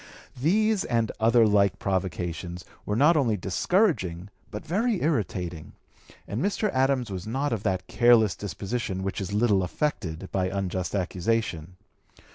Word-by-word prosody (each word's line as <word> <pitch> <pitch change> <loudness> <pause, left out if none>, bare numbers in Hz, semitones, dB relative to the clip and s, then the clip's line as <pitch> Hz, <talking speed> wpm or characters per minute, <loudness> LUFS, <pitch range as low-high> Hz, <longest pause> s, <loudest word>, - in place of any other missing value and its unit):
These 215 +6 +2
and 115 -2 0
other 115 +1 +5
like 100 -2 +3
provocations 90 -2 -3 0.2
were 105 - 0
not 150 +8 +5
only 120 -8 +2
discouraging 95 - 0 0.2
but - - -7
very 205 +6 0
irritating, 90 - -2 0.5
and 105 +5 -3
Mr. 205 0 0
Adams 130 -3 +1
was 95 +1 -5
not 135 +3 -1
of 110 - -2
that 95 -3 -1
careless 115 -7 +4
disposition 100 +2 -4
which 95 +1 -3
is 95 - -4
little 105 -2 +3
affected 90 - -3
by 95 -1 0
unjust 95 -1 -3
accusation. 90 -2 -2
105 Hz, 135 wpm, -26 LUFS, 95-130 Hz, 0.5 s, other